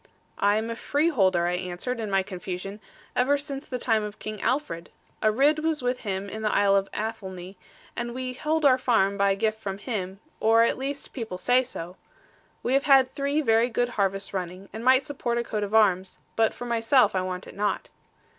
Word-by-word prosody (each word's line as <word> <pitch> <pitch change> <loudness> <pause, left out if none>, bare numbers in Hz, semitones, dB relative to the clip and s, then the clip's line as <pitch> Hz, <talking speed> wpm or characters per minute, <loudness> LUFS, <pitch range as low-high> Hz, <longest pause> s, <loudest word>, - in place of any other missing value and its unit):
'I 205 +1 +3
am 220 +1 -1
a - - -3
freeholder,' 230 - +2
I 175 - 0
answered, 180 +7 -3
in 220 -2 -3
my 195 -1 +2
confusion, 185 +1 -6 0.4
'ever 275 +3 +3
since 280 0 -6
the 250 - -3
time 225 -3 +1
of 210 0 -6
King 215 -1 -6
Alfred. 255 - -1 0.3
A 215 - +4
Ridd 285 +7 +3
was 310 -3 -1
with 250 0 0
him 195 -2 -3
in 220 +2 -6
the 215 - +1
isle 200 -1 +4
of 195 0 +1
Athelney, 195 -4 -5 0.4
and 240 0 -4
we 255 0 -3
hold 305 +4 0
our 260 -2 +6
farm 220 -6 +2
by 200 -1 +2
gift 220 +2 -1
from 195 -2 -4
him; 195 -4 -4 0.2
or 225 +1 +5
at 235 - +1
least 275 +1 -4
people 225 -8 -5
say 245 +6 +3
so. 180 -8 -7 0.7
We 250 - 0
have 275 +1 +2
had 270 -2 +6
three 280 +2 0
very 230 -2 +3
good 245 +1 0
harvests 195 -3 -1
running, 185 +1 -5
and 220 +2 -6
might 260 +2 +5
support 245 -4 -2
a 235 - 0
coat 215 -2 -3
of 205 +1 -2
arms; 190 -4 +3 0.2
but 225 -1 +3
for 245 - -8
myself 235 0 +3
I 185 - +1
want 185 0 -4
it - - -11
not.' 205 +1 -1
220 Hz, 205 wpm, -26 LUFS, 195-255 Hz, 0.7 s, our